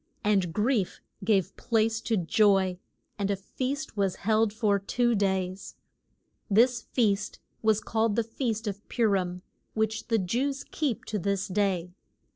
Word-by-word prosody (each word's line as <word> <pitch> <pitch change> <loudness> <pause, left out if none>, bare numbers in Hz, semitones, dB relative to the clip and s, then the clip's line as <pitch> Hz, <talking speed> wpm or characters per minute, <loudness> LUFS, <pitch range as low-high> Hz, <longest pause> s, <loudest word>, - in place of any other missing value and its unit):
And 195 -5 +2
grief 210 +1 0 0.2
gave 195 -2 +1
place 225 -1 +1
to 225 -2 0
joy, 190 0 +3 0.4
and 200 -1 0
a 200 - +2
feast 260 +8 -4
was 195 -3 +1
held 220 +2 +2
for 210 -2 +1
two 240 +5 +1
days. 190 -2 -1 0.7
This 240 +4 +4
feast 210 -4 0 0.2
was 220 -1 +3
called 220 -1 0
the 230 - +2
Feast 225 -1 -3
of 205 -1 -4
Pu 235 -2 +2
rim, 180 -3 -1 0.3
which 220 0 -1
the 230 - +2
Jews 250 +8 -1
keep 280 -9 -1
to 210 - -2
this 200 +1 -1
day. 185 -3 0
210 Hz, 145 wpm, -28 LUFS, 195-225 Hz, 0.7 s, This